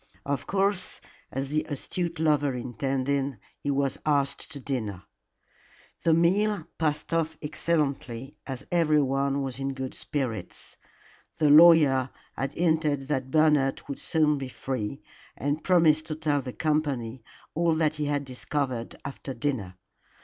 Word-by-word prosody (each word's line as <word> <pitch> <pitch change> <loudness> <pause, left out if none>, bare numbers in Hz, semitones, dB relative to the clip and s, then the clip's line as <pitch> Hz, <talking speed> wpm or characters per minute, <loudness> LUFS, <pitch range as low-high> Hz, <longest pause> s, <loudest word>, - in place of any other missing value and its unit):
Of 140 -1 -2
course, 195 -1 +1 0.3
as 135 +1 -3
the 155 +1 +1
astute 170 +4 -3
lover 145 -4 +2
intended, 135 +2 -1 0.2
he 145 - -3
was 140 -1 0
asked 145 0 0
to 140 - -7
dinner. 110 -9 -3 1.0
The 165 -1 +4
meal 190 +2 +2
passed 155 0 -1
off 160 -1 0
excellently, 145 -5 -2
as 130 -3 -5
everyone 140 -4 +2
was 135 -1 -5
in 135 0 -2
good 130 -1 -4
spirits. 120 - -4 0.6
The 150 -2 +4
lawyer 150 -5 +7 0.3
had 135 - -2
hinted 155 -5 +1
that 130 -3 -1
Bernard 150 -2 +3
would 140 - -5
soon 150 -3 +2
be 135 -1 -5
free, 130 -1 -4 0.3
and 145 +2 -1
promised 160 -4 +4
to 155 - -3
tell 150 -2 0
the 125 -1 -6
company 140 -6 -1 0.3
all 165 0 +2
that 155 -1 +1
he 150 - -1
had 145 -1 -1
discovered 130 -2 -3
after 135 -1 -6
dinner. 115 -11 -2
145 Hz, 135 wpm, -27 LUFS, 135-155 Hz, 1.0 s, lawyer